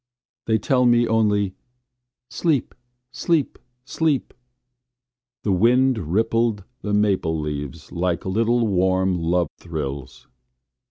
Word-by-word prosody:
They 110 -1 +3
tell 125 +4 +2
me 120 0 +4
only: 105 -3 +1 0.8
"sleep, 155 -8 0 0.4
sleep, 165 -5 0 0.3
sleep." 150 -1 -1 1.1
The 105 - 0
wind 125 +6 +3
rippled 115 0 +1 0.2
the 105 - -3
maple 95 -6 +1
leaves 75 -3 -5
like 85 0 -1
little 115 +5 +1
warm 95 -2 +1
love 85 +1 +1
thrills. 70 -6 -6
105 Hz, 100 wpm, -22 LUFS, 90-120 Hz, 1.1 s, me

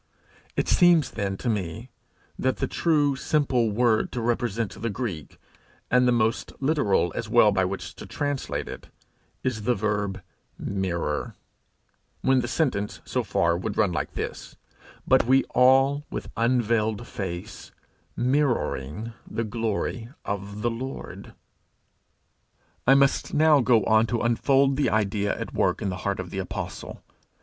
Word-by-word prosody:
It - - +1
seems, 175 -5 +4
then, 100 -2 -3
to - - -5
me, 105 +2 -3 0.5
that 130 0 0
the - - 0
true 150 -4 +2
simple 135 -5 +1
word 110 +1 +2
to 125 - -2
represent 115 -2 -1
the 115 - -1
Greek, 100 - -5 0.5
and 125 0 +4
the - - +4
most 115 -1 0
literal 135 - +1
as 115 -2 -4
well 110 -2 +6
by 95 -2 +2
which 95 +1 -5
to - - -9
translate 145 -2 -3
it, - - -8 0.6
is 125 -4 -1
the 120 +3 +1
verb 105 -1 -1 0.4
mirror 95 -3 -2 0.9
when 130 -1 +3
the 120 - -3
sentence, 105 -9 -1
so - - -1
far, 85 0 +1
would 100 +4 -4
run 90 -5 +2 0.2
thus: - - -5 0.5
'But - - +4
we 135 +1 +5
all, 135 +3 +4
with - - -6
unveiled 115 -2 +1
face, 90 -5 -6 0.5
mirroring 115 - 0 0.2
the 115 - -2
glory 115 +1 -2 0.2
of 100 +1 -4
the 120 - +1
Lord, 130 +4 -7 0.7
.' - - -42
I 135 - +7
must 140 0 +2
now 155 -1 +5
go 120 -3 +4
on 110 +1 +4
to 115 0 -1
unfold 135 +3 +3
the 145 - +2
idea 105 -1 0
at - - -5
work - - +1
in - - -2
the 90 - -3
heart 100 -1 -1
of 90 -2 -6
the 95 - -3
apostle. 95 - -6
115 Hz, 145 wpm, -25 LUFS, 100-130 Hz, 0.9 s, I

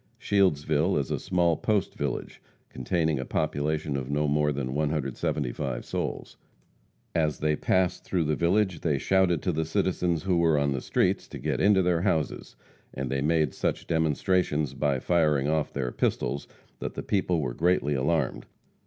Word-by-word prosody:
Shieldsville 80 -3 +2
is 70 - -2
a - - -1
small 85 -2 +2
post 105 -4 0
village, - - -4 0.3
containing 80 +2 -1
a - - -2
population 75 +2 -1
of 65 -1 -3
no 75 +1 +1
more 75 +1 +2
than 65 -2 -3
175 70 -3 -2
souls. - - -4 0.8
As 75 -2 +1
they 75 0 +1
passed 95 +3 +1
through 90 -3 0
the 75 0 0
village, 90 +1 +1
they 75 -4 0
shouted 95 +1 +2
to 90 - +1
the 80 0 -1
citizens 85 -1 0
who 90 -2 +1
were 80 -2 +3
on 70 -1 +1
the 65 -2 -2
streets - - 0
to - - -8
get - - -2
into 100 -1 +4
their 90 -2 +2
houses, 85 -5 -1 0.4
and 65 -1 -4
they 70 0 0
made 75 -1 +1
such - - -2
demonstrations 80 -2 +1
by 70 -1 0
firing 75 -4 +2
off 80 0 0
their 65 -3 -2
pistols 70 - -1 0.3
that - - -5
the - - -4
people 90 -4 0
were 65 -5 -2
greatly 80 -1 +1
alarmed. 70 +1 0
75 Hz, 165 wpm, -27 LUFS, 70-90 Hz, 0.8 s, into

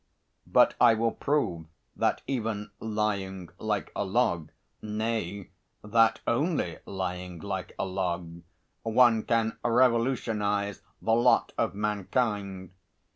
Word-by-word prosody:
But - - +5
I 115 - +7
will 115 +1 +1
prove 90 - -1 0.3
that - - 0
even 110 -5 -3
lying 100 -4 -2
like 105 -2 -2
a - - 0
log 95 -6 +1 0.3
nay, 105 -3 -3 0.3
that 115 +1 +3
only 140 - 0
lying 90 -2 -4
like 95 0 -5
a - - -1
log 90 -3 -3 0.4
one 115 0 +4
can 115 0 0
revolutionise 115 -5 +1 0.2
the 110 - +2
lot 120 +2 +4
of - - 0
mankind. 100 -2 -1
105 Hz, 110 wpm, -28 LUFS, 95-115 Hz, 0.4 s, I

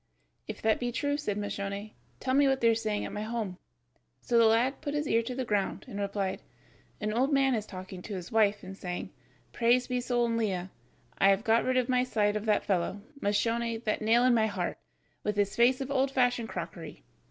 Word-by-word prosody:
"If - - -7
that 220 0 +3
be 245 0 -2
true," 285 +4 0
said 250 -9 -2
Moscione, 205 0 -4 0.3
"tell 260 - -1
me 280 +1 +5
what 270 -1 +2
they 230 - +4
are - - +5
saying 215 -2 -1
at - - -6
my 210 - -3
home." 215 -4 -4 0.6
So 240 - -2
the 230 - +6
lad 235 +5 +2
put 295 -1 -3
his 295 0 0
ear 230 -2 +3
to 245 +2 -5
the 260 0 -2
ground, 205 -4 -1
and 200 - -6
replied: 200 -1 -2 0.6
"An 215 0 -2
old 260 +5 +2
man 270 -1 +3
is 215 -3 -2
talking 185 -1 -8
to 205 +2 -6
his 180 -2 -7
wife 210 -2 +3
and 190 +1 -8
saying, 180 -2 -5 0.4
'Praised 245 +2 +2
be 250 0 0
Sol 240 -1 +1
in 230 -1 0
Lea, 190 -5 -1 0.5
I 195 - +6
have 195 +2 +3
got 225 -1 +3
rid 255 0 +1
from 255 - -2
my 250 0 +3
side 210 -4 +1
of 210 0 -2
that 210 - +2
fellow, 195 +1 -1 0.2
Moscione, 230 +3 0
that 215 - 0
nail 230 +3 +4
in 255 -1 +5
my 220 -2 +3
heart, 205 - -3 0.4
with 210 - -1
his 200 -1 +1
face 250 +3 +4
of 270 +1 -4
old 270 0 +2
fashioned 245 -3 +1
crockery. - - -7
225 Hz, 220 wpm, -29 LUFS, 205-250 Hz, 0.6 s, the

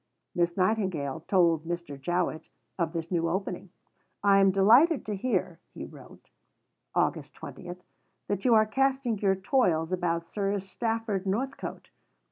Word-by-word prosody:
Miss 175 0 0
Nightingale 185 -7 0
told 170 -5 +3
Mr. 170 -3 -5
Jowett 170 +3 -2 0.3
of 165 -2 0
this 165 0 -5
new 165 -2 +1
opening. 185 0 -3 0.5
"I 200 -1 +5
am 195 0 +5
delighted 235 - +5
to 210 - -3
hear," 185 -6 -1 0.2
he - - -6
wrote - - -15 0.6
(Aug. - - 0
20), 180 -2 -9 0.5
"that 200 -1 -2
you 245 -3 +5
are 215 0 +5
casting 265 -1 0
your 195 -2 +2
toils 185 - +1
about 170 -2 -1
Sir 200 +2 -1
Stafford 210 0 -3
Northcote. 260 +8 -4
190 Hz, 135 wpm, -28 LUFS, 170-215 Hz, 0.6 s, I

